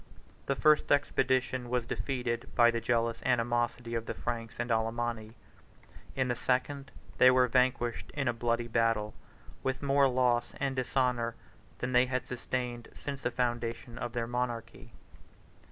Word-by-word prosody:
The 140 - +1
first 150 +2 +4
expedition 130 -3 +1
was 125 -1 0
defeated 120 -2 -2
by 120 -1 +6
the 115 0 -2
jealous 115 0 +1
animosity 120 -1 0
of 115 -1 -2
the - - -3
Franks 115 -2 -4
and 120 - -2
Alemanni. 115 0 -1 0.8
In 130 -1 +1
the 120 - 0
second 135 +3 -1 0.3
they 130 - +9
were 130 0 +5
vanquished 125 -1 +1
in 135 -2 -1
a 120 - +2
bloody 115 0 -1
battle, 115 -2 +1 0.5
with 130 +1 -2
more 140 0 +4
loss 125 -2 +1
and 135 -1 -1
dishonor 125 -2 0 0.4
than 125 - -3
they 125 0 +4
had 125 0 -2
sustained 125 -1 -4
since 140 -2 -6
the - - 0
foundation 120 -1 -2
of 120 - -4
their 120 -1 -1
monarchy. 120 -1 -4
120 Hz, 150 wpm, -31 LUFS, 115-130 Hz, 0.8 s, they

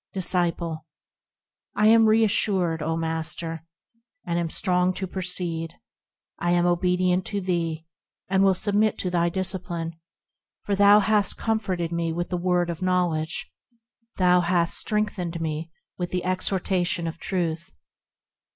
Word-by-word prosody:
Disciple. 170 -4 0 0.9
I 210 - +2
am 225 0 +6
reassured, 200 -6 +2
O 160 +1 -1
Master! 165 0 -4 0.6
and 170 0 -1
am 170 -1 -2
strong 180 +2 +1
to 190 - -3
proceed: 175 -3 -2 0.6
I 175 - -1
am 175 0 +3
obedient 180 +1 +2
to 205 - -2
thee, 165 -4 -2 0.4
and 190 0 +2
will 195 -1 +4
submit 210 +2 +1
to 180 - -3
thy 170 -1 +2
discipline, 175 -2 -3 0.7
For 205 - -2
thou 205 +1 +6
hast 205 0 +2
comforted 190 -7 -1
me 170 -1 -1
with 175 +2 -3
the 180 - -1
word 175 -1 +1
of 170 - -8
knowledge; 175 -3 -1 0.7
Thou 180 -1 +4
hast 170 -1 +1
strengthened 200 -6 -2
me 160 0 -3 0.3
with 175 -1 -2
the 180 -1 -2
exhortation 185 -1 0
of 165 0 -5
Truth. 170 -3 -2
180 Hz, 135 wpm, -25 LUFS, 170-190 Hz, 0.9 s, am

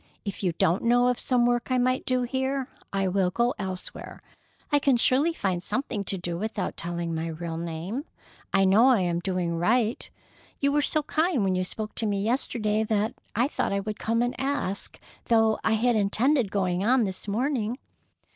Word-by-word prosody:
If 200 - -5
you 180 -4 0
don't 165 +2 +2
know 245 +1 +4
of 250 - 0
some 245 -2 +2
work 240 +1 +1
I 255 - +2
might 255 +1 +1
do 255 -1 +1
here, 265 +2 -2 0.2
I 195 -1 0
will 185 0 +1
go 235 +6 +1
elsewhere. 190 -2 -6 0.5
I 290 - +4
can 275 -3 +3
surely 270 +7 +3
find 190 - -2
something 225 0 -2
to 195 - -1
do 175 -1 -4
without 215 -2 -3
telling 170 0 -3
my 160 +1 -2
real 165 0 -5
name. 170 - -4 0.5
I 195 0 +4
know 210 +6 +5
I 250 -7 +5
am 175 -1 0
doing 175 -2 -2
right. 225 +5 +1 0.5
You 280 0 +2
were 295 +1 +2
so 305 +1 0
kind 315 - +1
when 190 -1 +1
you 185 0 0
spoke 215 +3 -5
to 225 - +1
me 200 -1 0
yesterday, 220 -2 0
that 215 0 0 0.2
I 240 +5 +3
thought 285 - -2
I 200 - 0
would 210 +1 -5
come 230 +1 +1
and 245 - -1
ask 270 -8 -3 0.3
though 225 -1 +3
I 220 - +2
had 235 +2 +2
intended 220 +4 +2
going 185 -2 0
on 245 +3 +4
this 190 0 -4
morning." 235 +1 -1
220 Hz, 195 wpm, -26 LUFS, 190-250 Hz, 0.5 s, know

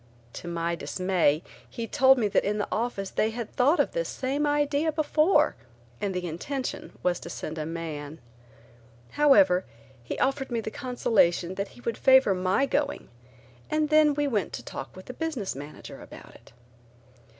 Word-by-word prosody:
To - - -8
my 170 0 -1
dismay 170 0 +1 0.3
he 230 - -5
told 265 +4 +5
me 225 -4 +2
that - - +2
in 210 +1 -1
the 205 - -1
office 215 -4 -2
they 220 - +1
had 230 0 -6
thought 280 +7 +3
of - - +2
this - - -2
same 280 +3 -1
idea 290 +1 +1
before 305 +1 +3 0.5
and 200 - -1
the 180 -1 -3
intention 255 - -5
was 180 -1 +1
to - - -9
send 155 +1 -5
a 155 - -3
man. 160 -2 -6 0.9
However 280 -10 +5 0.4
he 120 - -5
offered 270 0 0
me 235 -2 -1
the 220 -1 -5
consolation 200 -9 +1
that 200 +1 -3
he - - -13
would 230 -2 -3
favor 265 -6 +6
my 185 +8 +1
going, 285 +1 -2 0.6
and 305 -1 +1
then 305 -1 +5
we 290 0 +1
went 215 -8 -1
to - - -6
talk - - -8
with 185 - -11
the 255 - -7
business 270 -9 -3
manager 145 +2 -9
about - - -12
it. - - -18
230 Hz, 170 wpm, -27 LUFS, 180-285 Hz, 0.9 s, favor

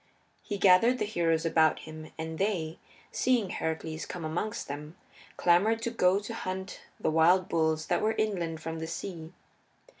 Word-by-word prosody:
He 205 - -4
gathered 200 +6 +5
the - - -1
heroes 165 -5 0
about 160 -1 +4
him, 155 0 -10
and 160 0 -5
they, 175 -6 -1 0.3
seeing 245 -6 +1
Heracles 160 0 -3
come 175 -3 -6
amongst 175 +7 -3
them, 150 +4 -7 0.4
clamored 210 +6 +3
to 235 - -1
go 185 -4 +3
to 205 +3 -5
hunt 190 -3 -5 0.2
the - - 0
wild 175 +4 +4
bulls 160 -1 +1
that - - 0
were 220 +1 +2
inland 175 -7 -1
from 165 0 -5
the 160 - -4
sea. 165 -1 -6
170 Hz, 160 wpm, -29 LUFS, 160-200 Hz, 0.4 s, gathered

